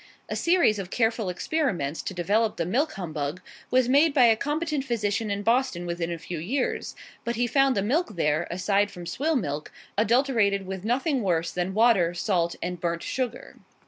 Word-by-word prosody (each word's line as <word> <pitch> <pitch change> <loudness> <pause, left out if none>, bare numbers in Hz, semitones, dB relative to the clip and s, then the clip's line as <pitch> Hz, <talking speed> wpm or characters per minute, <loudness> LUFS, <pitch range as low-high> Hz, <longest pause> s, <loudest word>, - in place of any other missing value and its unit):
A - - -2
series 335 - +3
of 185 -2 -5
careful 225 -3 0
experiments 180 - -1
to - - -5
develop 210 +5 +1
the 170 - -1
milk 280 - 0
humbug 155 -4 -4 0.3
was 255 -1 +3
made 285 +4 +4
by 255 -4 +7
a 225 -1 +6
competent 295 +3 -2
physician 220 -4 -1
in 200 0 -2
Boston 230 -6 +1
within 170 -1 -3
a 170 - -3
few 165 +1 -6
years, 250 - -2 0.3
but 235 0 -2
he 245 - +1
found 270 +1 +3
the 195 - +1
milk 250 - 0
there 155 0 +1
(aside 200 +3 +1
from 175 -3 -9
swill 305 - -1
milk) 150 - -2 0.3
adulterated 225 -4 +2
with 190 0 -6
nothing 265 +4 0
worse 170 -4 0
than 180 +2 -2
water, 205 -7 +4
salt, 175 -2 0
and 180 0 -3
burnt 170 -1 -2
sugar. 250 -3 -4
205 Hz, 180 wpm, -26 LUFS, 175-255 Hz, 0.3 s, by